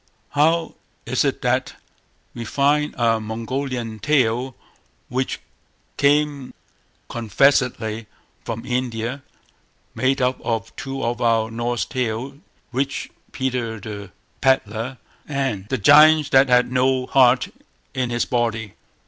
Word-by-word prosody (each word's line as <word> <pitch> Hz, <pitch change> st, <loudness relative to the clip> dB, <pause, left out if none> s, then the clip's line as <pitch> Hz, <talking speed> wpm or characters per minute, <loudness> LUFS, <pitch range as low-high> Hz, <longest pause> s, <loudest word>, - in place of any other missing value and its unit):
How 160 Hz, +3 st, +2 dB, 0.3 s
is -, -, +1 dB
it -, -, -1 dB
that -, -, 0 dB, 0.6 s
we 120 Hz, -, -6 dB
find 145 Hz, +5 st, +1 dB
a 115 Hz, -2 st, +2 dB
Mongolian 115 Hz, +1 st, -4 dB
tale, 130 Hz, -2 st, +1 dB, 0.5 s
which 130 Hz, +1 st, -2 dB, 0.6 s
came 145 Hz, -2 st, +1 dB, 0.5 s
confessedly 115 Hz, -1 st, +1 dB, 0.4 s
from 115 Hz, +1 st, -5 dB
India, 125 Hz, +1 st, -2 dB, 0.7 s
made 130 Hz, +1 st, +1 dB
up 125 Hz, 0 st, 0 dB
of 115 Hz, -1 st, -3 dB
two 135 Hz, 0 st, -5 dB
of 120 Hz, +1 st, -2 dB
our 115 Hz, -1 st, +2 dB
Norse 120 Hz, +1 st, -1 dB
tales, 125 Hz, +1 st, -3 dB, 0.4 s
"Rich 135 Hz, +2 st, -2 dB, 0.2 s
Peter 125 Hz, -4 st, -2 dB
the 100 Hz, -1 st, -7 dB, 0.3 s
Pedlar" 125 Hz, -1 st, +1 dB, 0.3 s
and 135 Hz, -9 st, -2 dB
"The 130 Hz, -, 0 dB
Giant 150 Hz, +5 st, +6 dB
that 135 Hz, 0 st, +5 dB
had 125 Hz, 0 st, +4 dB
no 130 Hz, 0 st, +2 dB
heart 130 Hz, -1 st, +4 dB, 0.4 s
in 130 Hz, -2 st, -1 dB
his 120 Hz, 0 st, 0 dB
body"? 115 Hz, -4 st, -1 dB
125 Hz, 115 wpm, -22 LUFS, 115-135 Hz, 0.7 s, Giant